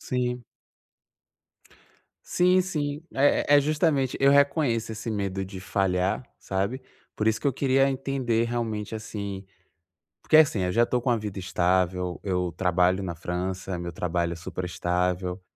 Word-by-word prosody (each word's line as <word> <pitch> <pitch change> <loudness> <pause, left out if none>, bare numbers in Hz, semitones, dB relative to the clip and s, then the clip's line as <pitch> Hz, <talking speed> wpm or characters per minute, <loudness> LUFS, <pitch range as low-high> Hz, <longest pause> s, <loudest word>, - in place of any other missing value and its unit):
Sim. 125 -1 -2 1.8
Sim, 180 +1 +3
sim. 150 -5 -3
É 145 +1 +4
é - - +6
justamente, 145 -3 +1
eu 135 0 +5
reconheço 140 -5 +2
esse 115 +1 -5
medo 100 -2 -2
de 95 0 -9
falhar, 95 +4 0
sabe, 100 +7 -2 0.3
por 110 - +1
isso 110 0 +1
que - - -3
eu 140 - +3
queria 135 +1 +2
entender 130 -4 0
realmente, 115 -3 -3
assim 100 -3 -6 0.8
porque 155 - +4
é - - +10
assim, 130 -10 -2
eu 90 - 0
já 115 +3 +4
estou 125 0 -1
com 125 - +1
a 120 - +3
vida 105 -3 -5
estável, 90 0 0
eu 90 -3 -1
trabalho 90 +1 +2
na 90 -3 -4
França, 90 +2 -3
meu 85 0 -5
trabalho 85 0 -1
é - - -9
super 90 +2 -6
estável, 90 +1 -1
105 Hz, 155 wpm, -26 LUFS, 90-130 Hz, 1.8 s, é